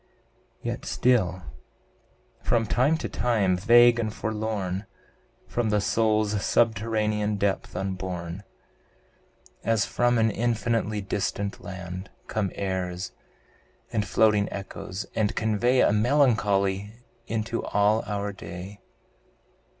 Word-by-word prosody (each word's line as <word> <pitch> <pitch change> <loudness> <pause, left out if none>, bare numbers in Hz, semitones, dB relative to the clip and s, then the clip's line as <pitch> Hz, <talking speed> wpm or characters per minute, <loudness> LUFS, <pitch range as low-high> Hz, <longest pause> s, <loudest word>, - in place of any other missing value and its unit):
Yet - - -3
still, 95 -8 +1 1.0
from 115 -1 +1
time 130 +8 +2
to - - -4
time, 105 -7 +1
vague 120 +4 +6
and 110 -2 -1
forlorn, 105 -3 -3 0.6
From 120 -2 -1
the 105 0 +2
soul's 110 -1 +1
subterranean 110 -2 +1
depth 100 -2 -1
upborne 90 -1 -4 1.2
As 115 -2 +2
from 120 0 +2
an 110 -1 +3
infinitely 115 -1 0
distant 100 +1 -3
land, 90 0 -7 0.2
Come 105 -3 -1
airs, 95 -1 -3 0.8
and 110 -2 +1
floating 105 +1 +3
echoes, 95 0 -6
and 110 -2 0
convey 115 +4 +2
A - - +4
melancholy 105 -5 +2 0.3
into 115 +1 -2
all 105 +2 +2
our 100 -1 -2
day. 95 +1 -8
105 Hz, 105 wpm, -26 LUFS, 95-115 Hz, 1.2 s, vague